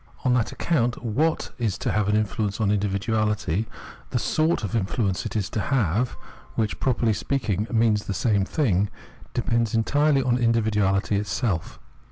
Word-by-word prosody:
On 125 - +4
that 120 -3 +1
account 125 -8 0
what 145 +8 0
is 110 -5 0
to - - -1
have 105 -1 +1
an 105 - +3
influence 105 -1 -1
on 110 -3 +2
individuahty, 105 -1 0 0.4
the - - -1
sort 160 -4 +1
of 105 - -2
influence 100 -2 0
it - - -8
is 100 -3 0
to - - -2
have 120 - 0 0.2
— - - -23
which, 110 -2 -1
properly 120 -3 +1
speaking, 110 -4 -1
means 110 -3 +2
the 100 - -2
same 105 -3 +2
thing 100 - +1 0.2
— - - -22
depends 115 -2 +1
entirely 145 +4 +3
on 125 -1 +1
individuahty 105 -4 +2
itself. 105 -4 -2
110 Hz, 165 wpm, -25 LUFS, 105-120 Hz, 0.4 s, On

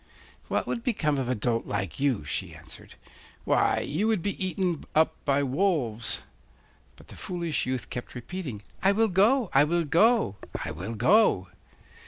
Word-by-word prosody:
'What - - -1
would 235 - -3
become 155 - 0
of 125 -2 -2
a 130 - +1
dolt 115 +1 -1
like 95 +3 -3
you?' 135 - 0
she 75 - -3
answered. - - -13 0.5
'Why, - - +2
you 180 +9 -1
would 215 -7 +1
be 200 -1 -2
eaten 180 -3 -1
up 160 +1 +4
by 140 0 +2
wolves.' 135 - 0 0.7
But - - -18
the - - -11
foolish 170 -7 -2
youth 130 -1 -3
kept 125 - -6
repeating, 125 - -6 0.2
'I 190 +2 +4
will 225 +2 +2
go, 210 +5 +3
I 135 - +6
will 170 +2 +1
go, 200 - +3 0.3
I - - -3
will 95 +9 -6
go! 110 - +3
155 Hz, 165 wpm, -27 LUFS, 120-190 Hz, 0.7 s, I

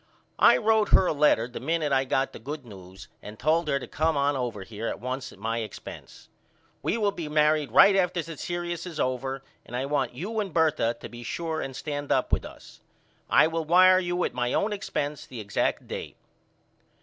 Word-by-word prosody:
I - - +7
wrote 220 -1 +2
her 190 - +6
a - - +1
letter 145 -6 +3
the 125 - -8
minute 155 +1 -1
I 135 0 +3
got 135 +1 0
the - - -9
good 140 +3 -7
news 95 -3 -12
and 105 +1 -10
told 160 +4 +1
her 140 -2 +2
to 140 - -6
come 160 0 0
on 140 +1 +2
over 120 -6 -3
here 110 +3 -6
at - - -4
once 130 +3 -4
at - - -15
my 115 +3 -2
expence. 110 -2 -9 0.5
We - - 0
will 205 -3 +1
be 170 -6 -6
married 150 -1 +2
right 200 - +7
after 180 -2 +1
the 165 +1 -8
serious 175 +2 -4
is 165 -4 -7
over 130 +1 -2 0.2
and 120 - -9
I 130 +2 -1
want 140 -4 -1
you 210 - -3
and 200 -3 -2
Bertha 155 -8 +2
to - - -6
be 120 0 -10
sure 160 +6 -3
and 135 -1 -5
stand 145 0 -4
up - - +1
with - - +1
us. - - -13 0.5
I - - +6
will 165 0 -1
wire 185 +3 +6
you 175 -1 -1
at - - -1
my 120 0 -1
own 210 +1 +1
expence 150 -7 -4
the 125 - -8
exact 100 -2 -1
date. - - -6
145 Hz, 210 wpm, -27 LUFS, 125-170 Hz, 0.5 s, I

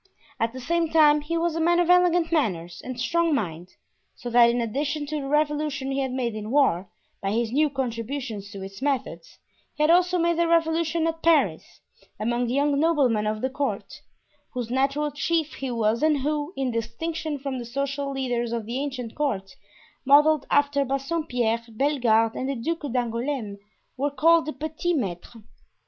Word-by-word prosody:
At 225 0 0
the 260 - -8
same 335 +5 0
time 300 -2 +5
he 335 +3 -2
was 335 -1 0
a - - -1
man 345 +2 +3
of 350 - +2
elegant 355 -2 +4
manners 175 - -1
and 255 -1 -6
strong 335 +5 +1
mind, 175 - -4 0.4
so 245 - -7
that 235 0 +6
in 240 +1 0
addition 285 +6 -2
to 300 0 -3
the 275 - -5
revolution 295 -2 0
he 270 - -1
had 265 -1 -1
made 250 -3 -2
in 215 0 -6
war, 230 -10 +2 0.3
by 195 - -1
his 230 +1 0
new 300 +4 +3
contributions 240 -4 -4
to 200 -2 -8
its 195 +3 -9
methods, 275 - -3 0.4
he 300 - 0
had 310 - +5
also 360 +1 +4
made 340 0 +1
a 340 - +3
revolution 330 0 +1
at 325 0 -2
Paris, 330 -1 +1 0.4
among 240 +2 0
the 245 - -1
young 285 0 +2
noblemen 270 -10 +2
of 215 0 -2
the 260 - 0
court, 280 +1 -4 0.5
whose 240 -2 -3
natural 275 +3 0
chief 320 +1 -1
he 270 - -5
was 230 0 0
and 305 -3 +2
who, 300 +2 -1
in 265 -2 -1
distinction 295 +7 -3
from 270 -1 -4
the - - -5
social 275 +3 -3
leaders 245 -3 -2
of 230 -2 -3
the 240 +4 -3
ancient 255 -5 -4
court, 205 -10 -2 0.5
modeled 295 +2 +5
after 285 -1 +3
Bassompierre, 265 -4 -1
Bellegarde 230 -3 +1
and 260 - -2
the 275 - -1
Duke 295 +3 -3
d'Angouleme, 235 -3 -2 0.4
were 280 +3 0
called 325 +3 +3
the 310 - -3
petits 315 +4 -2
maitres. 210 0 -5
275 Hz, 180 wpm, -25 LUFS, 235-310 Hz, 0.5 s, that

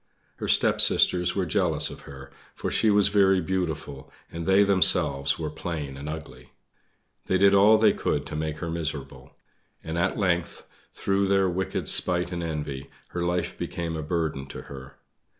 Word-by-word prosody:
Her - - -5
stepsisters 90 0 +3
were 95 -2 0
jealous 80 - 0
of - - -11
her, 70 0 -11 0.2
for - - -4
she 110 - +2
was 100 -1 +4
very 95 -2 +3
beautiful, 80 -6 -4 0.2
and 85 0 -6
they 95 +1 +5
themselves 70 -8 +3
were 80 -2 -4
plain 75 -4 -5
and 70 +2 -7
ugly. 80 0 -9 0.7
They 95 - +2
did 100 +1 +4
all 105 +3 +6
they 110 - +4
could - - -2
to - - -7
make 75 0 -3
her 85 0 -5
miserable; 75 -5 -6 0.5
and, 80 +1 -4
at 95 +2 0
length, 90 -5 -1 0.3
through 100 0 -1
their 95 -1 +2
wicked 95 +2 -3
spite 90 0 +3
and 85 -1 -4
envy, 75 -4 -5 0.2
her 90 - -4
life 85 0 -2
became 85 -1 -4
a 80 - -4
burden 75 -4 -3
to - - -9
her. 65 -1 -11
85 Hz, 170 wpm, -25 LUFS, 75-95 Hz, 0.7 s, all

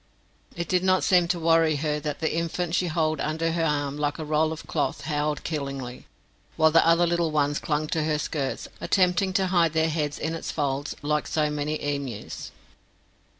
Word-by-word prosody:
It 170 -2 -3
did 180 0 +1
not 185 0 +3
seem 180 -2 +4
to 170 0 0
worry 165 -1 +3
her 150 +1 -1
that 150 -1 -4
the 160 - 0
infant 170 0 -2
she 180 0 +1
hold 155 -1 0
under 160 +2 -1
her 165 0 0
arm 145 -2 -1
like 145 -1 -1
a 160 - -5
roll 155 +1 +1
of 160 - -7
cloth 145 -4 -1
howled 150 -1 -1
killingly, 135 -5 -5 0.5
while 160 0 +5
the 165 - +6
other 170 +1 +5
little 170 -1 +1
ones 145 -1 +1
clung 150 0 -1
to 160 - 0
her 155 -1 +1
skirts, 145 -3 -3
attempting 185 0 +2
to 190 -1 +2
hide 165 -3 +3
their 160 0 +2
heads 150 -2 -2
in 160 - -2
its 165 - -5
folds 140 -1 -2
like 150 +1 0
so 155 -2 0
many 150 +1 -2
emus. 140 -6 -4
155 Hz, 195 wpm, -26 LUFS, 150-165 Hz, 0.5 s, the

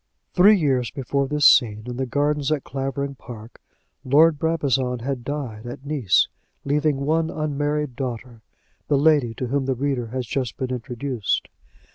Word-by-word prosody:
Three 200 +3 +6
years 130 -7 +1
before 140 0 -2
this 150 0 +1
scene 110 -4 +5
in 125 -1 -6
the 130 0 -2
gardens 145 +2 0
at 150 -3 0
Clavering 135 +1 -3
Park, 115 -4 -12 0.4
Lord 150 +3 +4
Brabazon 135 -6 0
had 130 -2 -3
died 125 -6 -5
at 125 +3 -8
Nice, 140 -10 +2 0.4
leaving 145 0 +1
one 160 +3 +1
unmarried 150 -2 -2
daughter, 120 -3 -5 0.5
the 145 - +2
lady 140 -6 +3
to 130 - -3
whom 135 +2 -1
the 130 - +1
reader 130 -2 -1
has 125 +2 -4
just 125 0 -3
been 130 -1 -3
introduced. 125 -2 -2
135 Hz, 155 wpm, -23 LUFS, 125-145 Hz, 0.5 s, Three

